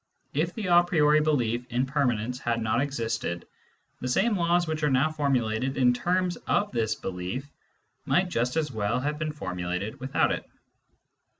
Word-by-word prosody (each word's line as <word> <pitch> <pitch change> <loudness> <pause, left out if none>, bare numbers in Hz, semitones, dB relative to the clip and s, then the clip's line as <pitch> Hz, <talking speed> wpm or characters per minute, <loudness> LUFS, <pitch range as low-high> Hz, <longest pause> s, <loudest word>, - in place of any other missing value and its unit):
If 165 +5 0
the 220 - -4
a 175 -1 +6
priori 155 -3 +4
belief 120 -6 +1
in 125 +2 +1
permanence 125 -3 0
had 115 -1 -1
not 110 +2 +1
existed, 115 -10 -2 0.5
the 125 - -3
same 200 - +2
laws 175 -1 +2
which 155 -1 -3
are 150 - +2
now 135 +4 +3
formulated 130 -4 0
in 125 -2 +4
terms 180 +5 0
of 205 0 +1
this 110 -2 0
belief 95 +10 -5 0.5
might 185 +1 +2
just 125 -3 -1
as 150 -3 0
well 110 0 0
have 150 +3 -2
been 155 -1 -1
formulated 90 -6 -4
without 130 +1 +1
it. - - -4
135 Hz, 165 wpm, -27 LUFS, 115-155 Hz, 0.5 s, a